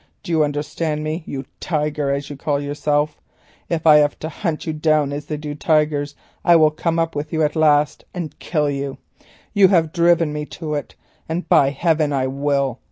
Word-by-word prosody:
Do 175 - -6
you 160 -2 +3
understand 150 +1 -2
me? 155 +2 -3
you 135 -1 -5
tiger, 150 -3 -1
as 140 +1 -2
you - - -6
call 140 +1 -1
yourself. 145 +1 -1 0.5
If 165 -2 -2
I 155 -2 +8
have 145 -1 +2
to 160 - -3
hunt 165 -1 -3
you 160 - -2
down, 155 -2 +1
as 145 0 -6
they 150 - -3
do 150 0 -5
tigers, 150 -1 +1 0.3
I 175 - +6
will 155 -2 +5
come 165 +2 -1
up 165 -1 0
with 150 +1 -4
you 160 -1 +1
at 150 +1 0
last 150 -2 +3
and 170 -5 -6
kill 150 -3 0
you. 140 -1 -3 0.6
You 200 -2 +6
have 165 -4 +2
driven 170 -3 +3
me 150 0 -4
to 155 -2 -4
it, 145 -1 -4 0.3
and, 170 +3 -3
by 135 - +5
heaven! 155 0 +1
I 135 -2 +1
will! 140 -1 -1
150 Hz, 200 wpm, -20 LUFS, 145-160 Hz, 0.6 s, I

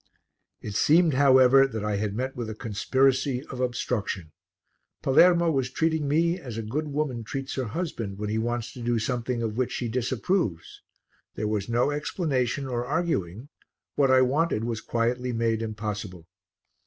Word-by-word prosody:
It 105 - -5
seemed, 160 - +4
however, 135 0 +6
that 110 -4 -5
I 105 -1 0
had 105 -1 -2
met 130 +3 -3
with 120 -3 -4
a 110 - -5
conspiracy 130 +5 +1
of 130 - -7
obstruction. 110 -9 -2 0.7
Palermo 170 +4 +5
was 135 -4 0
treating 160 +1 0
me 170 +5 +2
as 125 -9 -7
a 115 - -3
good 145 +9 -3
woman 140 -5 -2
treats 135 +5 -5
her 130 - -2
husband 115 - -4
when 105 +1 -3
he 110 +1 -1
wants 120 0 -2
to 125 - -9
do 120 0 0
something 120 +1 -2
of 110 0 -3
which 130 -1 0
she 120 - -2
disapproves 120 - -1 0.5
there 105 - -2
was 105 0 -2
no 120 +5 +2
explanation 145 -3 -1
or 120 -2 -2
arguing; 130 - -2 0.5
what 140 -2 +3
I 130 0 +6
wanted 135 -2 +1
was 115 -1 -3
quietly 120 +2 -1
made 115 -1 0
impossible. 105 -5 -5
125 Hz, 165 wpm, -26 LUFS, 110-140 Hz, 0.7 s, however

